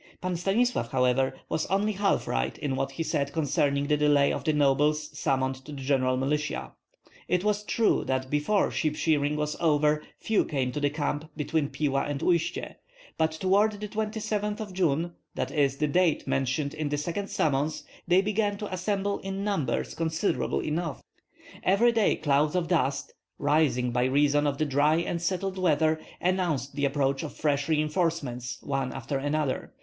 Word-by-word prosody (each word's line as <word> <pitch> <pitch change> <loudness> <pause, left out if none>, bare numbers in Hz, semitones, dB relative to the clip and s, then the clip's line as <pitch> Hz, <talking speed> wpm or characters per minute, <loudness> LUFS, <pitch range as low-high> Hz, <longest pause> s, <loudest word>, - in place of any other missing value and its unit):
Pan 185 0 -2
Stanislav, 195 - +1
however, 130 +1 +2
was 160 - -1
only 200 +3 +1
half 200 0 0
right 60 0 -1
in 135 -2 -2
what 135 +1 -2
he 165 - -2
said 140 -3 -1
concerning 145 -2 +1
the 150 +1 +2
delay 145 -1 +4
of - - -4
the 155 - +2
nobles 150 +1 +2
summoned 130 -2 -1
to 150 - -10
the 140 - -7
general 130 -2 +2
militia. 150 +3 -1 0.6
It 180 +1 +1
was 210 0 +1
true 225 +1 +2
that 130 0 -1
before 150 +8 +2
sheep 155 -2 0
shearing 150 -2 +1
was 150 0 -2
over 150 -2 +3 0.2
few 220 -2 +1
came 130 -4 -1
to 150 - -3
the 145 0 +2
camp 150 +1 -3
between 150 -1 0
Pila 140 -3 0
and 145 -1 -3
Uistsie; 170 -2 0 0.4
but 160 0 +3
toward 195 +6 +2
the 210 +1 -6
27th 210 0 -2
of 210 -3 -6
June, 170 -2 0 0.2
that - - -2
is, 140 -3 +1
the 150 - +1
date 170 +1 +2
mentioned 135 +2 0
in 155 -2 -3
the 145 - -1
second 175 +7 -3
summons 150 +1 0 0.2
they 180 +2 +5
began 205 0 0
to 205 -2 -5
assemble 200 +2 -1
in 195 0 -4
numbers 160 - -1
considerable 165 +3 -1
enough. 155 -1 -3 0.6
Every 210 +6 +4
day 225 -3 +2
clouds 150 +1 +1
of 175 -2 0
dust, 140 -6 0 0.2
rising 140 -4 +2
by 125 +1 +1
reason 145 +2 +3
of 140 -1 -1
the 155 - +1
dry 145 +2 +3
and 170 0 -1
settled 190 +1 -2
weather, 160 -2 +2 0.2
announced 175 -7 0
the 145 - +1
approach 135 -1 0
of 155 - -6
fresh 145 -1 0
reinforcements 150 -5 -1
one 135 -2 -2
after 135 +2 -3
another. 145 -1 -1
150 Hz, 175 wpm, -27 LUFS, 140-185 Hz, 0.6 s, they